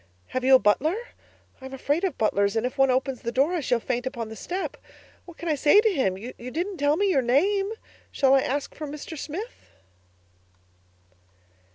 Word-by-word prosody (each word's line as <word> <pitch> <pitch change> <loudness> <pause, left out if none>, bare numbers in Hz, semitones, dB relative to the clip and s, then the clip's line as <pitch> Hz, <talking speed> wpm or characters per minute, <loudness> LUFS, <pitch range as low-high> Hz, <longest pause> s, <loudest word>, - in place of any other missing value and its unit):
Have 255 - -3
you 265 +1 +7
a - - +9
butler? 260 - +2 0.7
I'm 265 0 -7
afraid 290 +6 -1
of 380 - -1
butlers, 200 -1 +1
and 225 +1 0
if 250 - -3
one 270 -1 +3
opens 255 0 0
the 235 - -3
door 275 +8 +2
I 350 - 0
shall 250 -5 +1
faint 245 +1 -2
upon 235 -4 -5
the 220 - -8
step. 360 - -4 0.5
What 345 -2 -13
can 340 - -7
I 315 - +2
say 295 +7 +5
to 440 0 +3
him? 195 - 0
You 235 +6 -7
didn't 340 +11 -4
tell 290 +1 +2
me 405 - +2
your 275 - +3
name. 390 - +2 0.4
Shall 270 -1 +3
I 270 - +5
ask 280 +2 -2
for 305 - -6
Mr. 300 +2 -7
Smith? 350 - -7
275 Hz, 195 wpm, -25 LUFS, 250-330 Hz, 0.7 s, a